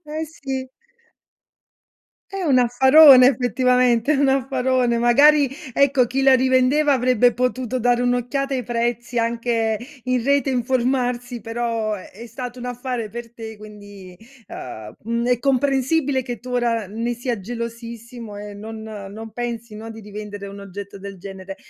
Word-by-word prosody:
Eh, 310 +1 -4
sì. 270 -4 -6 1.6
È 390 0 -5
un 280 -7 +3
affarone 265 +2 +7
effettivamente, 250 0 +2
è - - +2
un 275 0 +2
affarone. 260 -2 +1
Magari, 280 +4 +5 0.2
ecco, 275 -3 +3
chi 265 +3 -1
la 270 -1 +6
rivendeva, 260 +3 +3
avrebbe 245 -2 +3
potuto 250 0 -1
dare 245 0 +2
un'occhiata 245 +3 -1
ai 255 - -1
prezzi 240 0 -2
anche 230 -1 0 0.3
in 255 -1 0
rete 280 +2 +2
informarsi. 245 -1 -1
Però, 230 -1 -2
è 195 - -10
è - - -8
stato 245 +1 -7
un 245 - -7
affare 245 -2 -4
per 235 +1 -8
te. 220 -1 -8
Quindi, 205 -3 -12 0.3
uhm, 110 -4 -8
mhmm, 235 +2 -2
è 250 -1 +2
comprensibile 270 +1 +1
che 245 -2 -6
tu, 250 - -10
ora 235 -3 0
n 210 +4 -8
ne 240 +1 0
sia 240 -1 -3
gelosissimo 230 +1 -7
e 205 0 -8
non 220 +2 -8
non 215 0 -8
pensi, 235 -1 -5
no, 225 +1 -8
di 225 - -9
rivendere 205 -1 -8
un 200 0 -9
oggetto 200 +1 -9
del 195 -1 -9
genere. 195 0 -9
240 Hz, 150 wpm, -21 LUFS, 225-260 Hz, 1.6 s, affarone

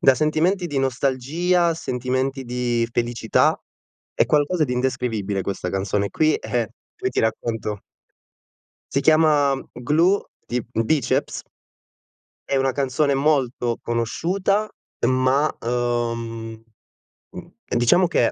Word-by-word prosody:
da 135 - +6
sentimenti 160 +6 +1
di 145 -4 -2
nostalgia, 140 +7 +1
a 165 - +1
sentimenti 130 -1 -2
di 120 -1 -1
felicità. 120 0 +1 0.6
È - - +3
qualcosa 155 +3 +2
di 125 - -3
indescrivibile 115 -6 -1
questa 95 -1 -3
canzone 100 +1 -1
qui, 155 0 +2
e 120 -4 -2 0.3
poi - - -2
ti - - 0
racconto 110 -2 -2 1.1
Si 140 - +2
chiama 150 -3 +4
Glue 160 +10 +2 0.2
di 120 -1 -2
Bicep. 120 +5 0 1.0
È 135 - -1
una 135 0 +2
canzone 140 +1 +1
molto 130 -4 +1
conosciuta 185 - 0 0.4
ma, 130 +4 +2
uhm, 115 -1 -2 0.8
mhmm, - - -11 0.2
mh, - - -1
diciamo 120 +10 +4
che - - +2
ha - - -2
130 Hz, 120 wpm, -22 LUFS, 120-155 Hz, 1.1 s, da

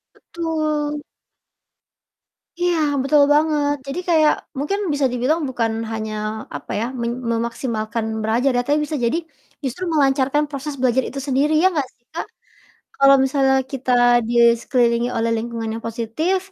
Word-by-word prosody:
Betul. 310 -3 -2 1.6
Iya, 350 -1 +1 0.2
betul 290 +2 +4
banget. 295 -1 +2
Jadi 275 +6 -3
kayak 315 -3 +5 0.2
mungkin 300 +9 -1
bisa 285 -1 +1
dibilang 255 +7 +1
bukan 230 -3 -1 0.2
hanya, 220 -1 -4 0.4
apa 145 - -7
ya, 230 - 0 0.2
men 235 0 -1 0.2
memaksimalkan 230 -1 -2 0.2
belajar 235 +5 +2
ya, - - +3
tapi 295 +1 +2
bisa 305 0 -3
jadi 245 +8 +1 0.5
justru 270 +7 -4
melancarkan 275 0 +2
proses 285 +1 -5
belajar 260 0 +2
itu 275 - -6
sendiri, 280 +3 +2
ya 375 - +7
gak 270 - -2
sih 240 - -44
Kak? 330 - -4 0.7
Kalau 275 0 +6
misalnya 270 0 +2 0.2
kita 255 -1 -1 0.4
di - - -2 0.3
sekelilingi 235 -1 +1
oleh 230 0 +1
lingkungan 230 0 -4
yang 230 - -8
positif, 235 - -1
270 Hz, 140 wpm, -21 LUFS, 235-300 Hz, 1.6 s, ya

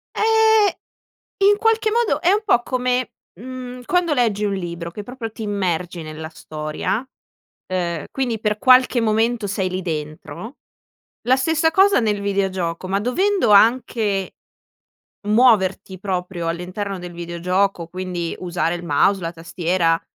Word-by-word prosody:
Eh, 440 -2 +4 0.7
in 410 - +5
qualche 450 -1 +2
modo 470 0 +1
è 360 +2 +3
un 425 +2 +1
po' 240 - +3
come, 250 0 -1 0.3
mhmm, 250 +1 -8
quando 355 -1 +1
leggi 220 -5 +1
un 200 -1 0
libro 170 -2 -5
che 205 +4 -7
proprio 240 0 -7
ti 220 - -9
immergi 180 -4 -2
nella 155 0 -7
storia, 155 - -4 0.6
ehm, 175 -4 -2
quindi 240 -5 -2
per 210 -1 0
qualche 255 0 +5
momento 225 0 +1
sei 190 -1 -1
lì 185 +1 -3
dentro. 155 - -6 0.7
La 260 - +6
stessa 320 +4 +1
cosa 385 -1 +5
nel 210 -3 0
videogioco, 190 -3 -2
ma 195 +1 0
dovendo 370 - +1
anche 210 -3 +3 0.9
muoverti 210 -5 +3
proprio 180 -3 -3
all'interno 185 +4 -4
del 175 0 -8
videogioco, 175 +1 -1
quindi 180 -1 -4
usare 175 -2 -1
il 175 0 -7
mouse, 180 +6 +2
la 165 0 -3
tastiera, 170 0 0
200 Hz, 135 wpm, -21 LUFS, 175-250 Hz, 0.9 s, La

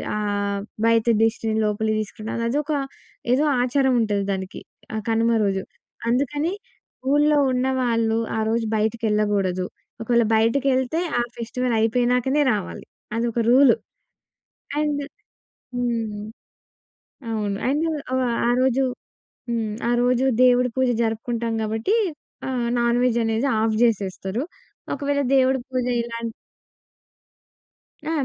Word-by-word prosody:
ఆహ్, 205 -1 -1 0.3
బయట 230 -1 +3 0.2
దిష్టిని 225 0 0
లోపలికి 215 +1 0
తీసుకునిరాదు. 220 +2 -5
అదొక 295 +4 -1 0.6
ఏదో 285 +4 +3 0.2
ఆచారముంటది 245 -6 +1
దానికి 190 -1 -5 0.3
ఆహ్, 215 - -3
కనుమ 225 +1 +2 0.2
రోజు. 195 -1 0 0.5
అందుకని 290 +7 0 0.6
ఊళ్ళో 295 +1 +4
ఉన్నవాళ్ళు, 250 -3 +1 0.2
ఆ - - 0
రోజు 230 0 0
బయటికెళ్ళగూడదు. 210 -4 0 0.4
ఒకవేళ 235 0 +2
బయటకెళ్తే 260 +5 +2 0.2
ఆ - - +3 0.2
ఫెస్టివలయిపోయినాకనే 245 +3 +1
రావాలి. 205 -3 -5 0.3
అదొక 235 0 -1
రూలు. 260 -1 +6 1.0
అండ్ 295 -1 0 0.7
హ్మ్. 230 -4 -2 1.1
అవును. 205 -2 -1
అండ్ 295 +4 +1 0.3
ఆహ్, 260 0 +1 0.2
ఆ - - +3
రోజు 265 +1 +2 0.7
హ్మ్. 225 -3 -1 0.2
ఆ - - +2
రోజు 250 +1 +2 0.2
దేవుడి 250 0 +4
పూజ 260 0 +3
జరుపుకుంటాం 230 +1 -1
గాబట్టీ, 220 - 0 0.5
ఆహ్, 250 -2 -1
నాన్‌వెజ్ 235 0 +2
అనేది 225 +4 0
ఆఫ్ 220 0 +1
జేసేస్తరు. 200 0 0 0.5
ఒకవేళ 285 0 0
దేవుడి 265 0 +3
పూజ 255 -1 -1 0.2
ఇలాన్ 230 0 -4 1.8
ఆ! - - -1
235 Hz, 105 wpm, -23 LUFS, 220-255 Hz, 1.8 s, రూలు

